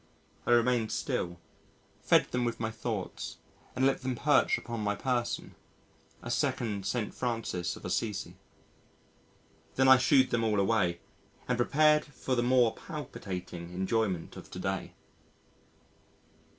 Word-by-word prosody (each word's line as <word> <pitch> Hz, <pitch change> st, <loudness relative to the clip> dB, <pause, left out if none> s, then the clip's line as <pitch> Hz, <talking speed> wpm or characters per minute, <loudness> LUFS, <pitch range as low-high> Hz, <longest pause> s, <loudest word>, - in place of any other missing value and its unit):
I -, -, +3 dB
remained 120 Hz, -1 st, +3 dB
still, 85 Hz, 0 st, -2 dB, 0.6 s
fed -, -, +3 dB
them 125 Hz, 0 st, 0 dB
with 120 Hz, -1 st, -2 dB
my 110 Hz, -1 st, -2 dB
thoughts -, -, -4 dB, 0.4 s
and 130 Hz, -, +2 dB
let 135 Hz, -, +2 dB
them 130 Hz, -1 st, -2 dB
perch 145 Hz, +3 st, +3 dB
upon 120 Hz, -1 st, -5 dB
my 105 Hz, 0 st, 0 dB
person 125 Hz, +1 st, -2 dB, 0.7 s
a -, -, -4 dB
second 100 Hz, -5 st, -1 dB
St. 115 Hz, -4 st, -2 dB
Francis 115 Hz, -8 st, -2 dB
of -, -, -11 dB
Assisi. 100 Hz, +2 st, -2 dB, 1.4 s
Then 130 Hz, 0 st, +4 dB
I 130 Hz, 0 st, +9 dB
shoo'ed 130 Hz, 0 st, +4 dB
them 120 Hz, -1 st, +1 dB
all 105 Hz, -2 st, +2 dB
away 95 Hz, -4 st, +1 dB, 0.5 s
and 125 Hz, -, +1 dB
prepared 150 Hz, +5 st, +4 dB
for 135 Hz, -2 st, -4 dB
the 120 Hz, -, +2 dB
more 120 Hz, -2 st, +4 dB
palpitating 90 Hz, -, -7 dB
enjoyment 95 Hz, -2 st, -1 dB
of -, -, -10 dB
to -, -, -8 dB
day. -, -, -3 dB
115 Hz, 135 wpm, -30 LUFS, 100-130 Hz, 1.4 s, I